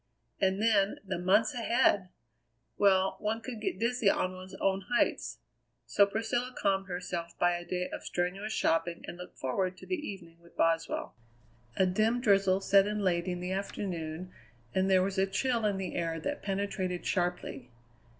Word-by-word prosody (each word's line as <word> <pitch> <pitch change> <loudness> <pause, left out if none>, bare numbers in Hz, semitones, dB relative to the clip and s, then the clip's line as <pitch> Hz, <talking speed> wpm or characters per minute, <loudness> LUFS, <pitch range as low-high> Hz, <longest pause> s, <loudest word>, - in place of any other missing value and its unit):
And 190 0 +2
then 210 -2 +3
the 185 -2 -3
months 195 +5 +3
ahead! 230 -5 +2 0.7
Well 190 -1 +3
one 220 +2 -1
could 230 -1 -7
get 210 - -2
dizzy 235 0 +2
on 185 -1 +1
one's 185 +1 -10
own 190 0 0
heights. 125 - +1 0.5
So 125 - +4
Priscilla 230 +4 -2
calmed 195 -1 +1
herself 175 -2 -4
by 175 - +3
a 175 - -5
day 180 +1 -2
of - - -5
strenuous 195 +5 -2
shopping 170 -3 0
and - - -6
looked 180 +1 -11
forward 185 +8 -1
to - - -12
the - - -3
evening 170 - -8
with 170 0 -21
Boswell. 165 -1 +1 0.6
A 190 - +4
dim 215 +6 +2
drizzle 195 -4 +3
set 195 0 +5
in 210 0 -2
late 175 -1 +1
in 180 -1 -2
the 180 +1 -3
afternoon, 180 -3 -4 0.4
and 190 0 +2
there 185 -1 +5
was 190 0 -1
a 195 - +3
chill 230 +3 0
in 200 -2 0
the 190 -2 -4
air 165 -1 -1
that 290 - -3
penetrated 195 -2 -2
sharply. 175 -8 -2
190 Hz, 170 wpm, -31 LUFS, 180-205 Hz, 0.7 s, set